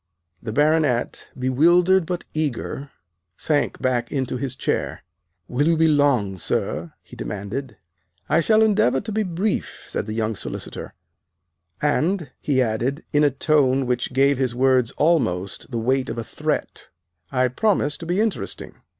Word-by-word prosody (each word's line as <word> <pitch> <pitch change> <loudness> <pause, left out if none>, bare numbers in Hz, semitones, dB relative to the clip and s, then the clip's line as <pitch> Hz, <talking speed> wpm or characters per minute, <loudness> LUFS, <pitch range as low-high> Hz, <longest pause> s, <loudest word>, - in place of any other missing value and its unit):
The 110 - -5
Baronet, 150 -2 +1
bewildered 170 +8 +4
but 175 -1 -3
eager, 145 -2 -3 0.5
sank 145 -2 0
back 120 -2 0
into 130 -3 -1
his 130 0 -3
chair. - - -2 0.4
"Will 140 +5 +1
you 165 -1 +3
be 160 0 +4
long, 135 - +2
sir!" 80 0 -2
he - - -14
demanded. 105 - -5 0.5
"I 155 - +3
shall 215 +6 +4
endeavor 200 - +3
to 215 - -6
be 215 +1 0
brief," 190 +2 -2
said - - -3
the 110 - -4
young 110 -1 -1
solicitor; - - -6 0.9
"and," 155 +1 +1
he 130 -3 +2
added, 125 +6 -1
in 150 0 +4
a 145 - +5
tone 135 -1 +2
which 125 0 -1
gave 135 +1 +3
his 130 -3 0
words 130 -2 +3
almost 100 - +1
the 120 - -3
weight 130 +3 0
of - - -4
a 115 - -2
threat, - - -3 0.4
"I 130 -1 +2
promise 150 - +1
to 165 - -8
be 175 +3 0
interesting." 220 -2 -2
135 Hz, 150 wpm, -23 LUFS, 125-160 Hz, 0.9 s, a